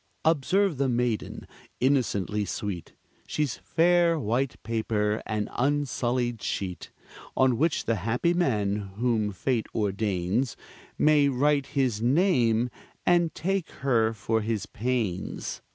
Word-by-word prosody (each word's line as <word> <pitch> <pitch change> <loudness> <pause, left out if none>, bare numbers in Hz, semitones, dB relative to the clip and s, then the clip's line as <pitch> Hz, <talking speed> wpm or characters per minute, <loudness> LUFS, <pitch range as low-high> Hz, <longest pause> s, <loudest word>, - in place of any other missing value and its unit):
Observe 165 +3 +2
the 135 -1 +2
maiden, 120 -2 -1 0.3
innocently 105 -7 +1
sweet; 100 -3 -5 0.3
She's 150 -5 -1
fair 170 0 +3
white 125 +2 0
paper, 110 -1 0
an 105 -2 -1
unsullied 125 -4 0
sheet, 90 -2 -4 0.5
On 130 -2 +4
which 155 +6 +1
the 115 -1 +1
happy 115 - +1
man, 105 - +1 0.2
whom 110 -2 +1
fate 115 +5 -1
ordains, 105 +2 0 0.4
May 150 -2 +4
write 140 +1 +2
his 125 -6 +1
name, 125 - +3 0.3
and 175 -2 +3
take 190 +1 -1 0.2
her 115 -4 +3
for 110 +1 -1
his 110 -2 -2
pains. 110 -5 -3
120 Hz, 115 wpm, -27 LUFS, 110-145 Hz, 0.5 s, On